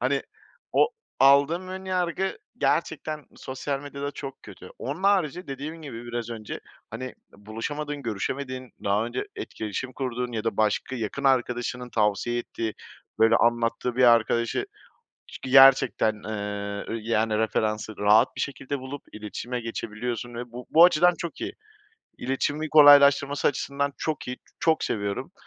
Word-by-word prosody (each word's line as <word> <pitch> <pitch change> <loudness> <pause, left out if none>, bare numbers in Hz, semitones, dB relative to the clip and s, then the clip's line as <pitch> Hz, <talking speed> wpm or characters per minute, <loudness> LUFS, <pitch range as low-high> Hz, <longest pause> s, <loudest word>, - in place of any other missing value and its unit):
Hani, 135 +3 +1 0.5
o, - - +4 0.3
aldığım 140 +7 +5
ön 190 0 -6
yargı 185 0 -1 0.2
gerçekten 155 -2 -1
sosyal 135 +1 -4
medyada 140 0 -5
çok 135 -2 -8
kötü. 95 -3 -12
Onun 145 +8 -5
harici 185 -4 +2
dediğim 150 +4 -6
gibi 120 -5 -8
biraz 120 -1 -4
önce, 110 -2 -6 0.3
hani, 115 +4 -5
eee, 130 - -7 0.2
buluşamadığın, 145 +8 -5
görüşemediğin, 130 +4 -4
daha 100 +2 +2
önce 120 +2 -3
etkileşim 110 +4 -5
kurduğun 125 -1 -3
ya 110 -1 -3
da 115 - -1
başka 110 +4 0
yakın 110 +3 -4
arkadaşının 125 -1 0
tavsiye 105 +3 +1
ettiği 115 -2 -4 0.4
böyle 115 +1 +5
anlattığı 120 +1 +1
bir 130 - +5
arkadaşı 115 - +3 0.6
ç - - -10
g 130 - -6
gerçekten, 135 -4 +6
eee, 100 -1 -4
ö - - -3
yani 110 -1 +1
referansı 110 -1 -1
rahat 105 +4 +5
bir - - -3
şekilde 140 0 -4
bulup, 130 +2 -7
iletişime 110 +4 -5
geçebiliyorsun 115 +1 -4
ve 120 0 -6
bu 125 +1 -8
bu 165 +2 +7
açıdan 180 +1 +4
çok 170 - -6
iyi - - -3 0.6
İletişimi 145 +4 -2
kolaylaştırması 145 -1 +7
açısından 140 0 -1
çok 155 -5 -3
iyi, 125 - -4 0.2
çok 160 -1 +2
seviyorum. 100 -1 -3
125 Hz, 145 wpm, -26 LUFS, 115-140 Hz, 0.6 s, bu